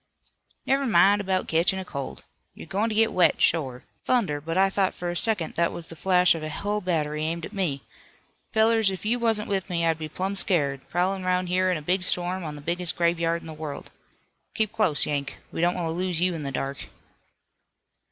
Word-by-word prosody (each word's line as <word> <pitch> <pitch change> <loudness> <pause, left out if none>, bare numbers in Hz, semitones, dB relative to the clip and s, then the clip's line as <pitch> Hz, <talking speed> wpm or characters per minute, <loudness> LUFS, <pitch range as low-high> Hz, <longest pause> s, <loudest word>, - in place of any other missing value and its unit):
"Never 275 0 +1
min' 205 0 +5
'bout 185 -1 0
ketchin' 180 +4 +1
cold. 140 -5 -6 0.3
You're - - -10
goin' 205 +4 -1
to 215 - -3
get 225 +1 +3
wet, 175 -4 +3
shore. 130 -6 +1 0.2
Thunder, 195 -13 +1
but 165 +3 -3
I 195 +1 +5
thought 195 -1 +1
fur 175 0 -3
a - - -5
second 185 -3 +2
that 170 0 +1
was 170 - -7
the 165 - -9
flash 180 +1 +4
of 165 - -5
a 155 - -4
hull 205 +6 -2
battery 155 -4 -1
aimed 165 +1 -2
at - - -10
me. 165 -9 -2 0.7
Fellers, 220 -1 +4
if 190 +1 -6
you 240 +3 +1
wasn't 225 -2 +1
with 195 -1 -2
me 170 -2 0
I'd 165 -1 +1
be 155 -1 -5
plumb 190 +5 -3
scared, 145 -8 +1
prowlin' 185 +2 0
'roun' 185 0 +1
here 185 +1 +1
in 180 - +1
a 155 - -8
big 180 +4 +1
storm 180 +1 0
on 150 -2 -5
the 145 - -9
biggest 175 +3 -1
graveyard 170 0 +1
in - - -13
the 160 - -7
world. 155 -2 -7 0.6
Keep 215 -2 0
close, 165 -11 +2
Yank, 140 -1 -3
we - - -3
don't 175 +1 +2
want 175 - -2
to 160 - -1
lose 180 0 -1
you 180 +1 +2
in 165 - -5
the 140 -1 -4
dark." 135 0 -4
175 Hz, 215 wpm, -25 LUFS, 160-195 Hz, 0.7 s, min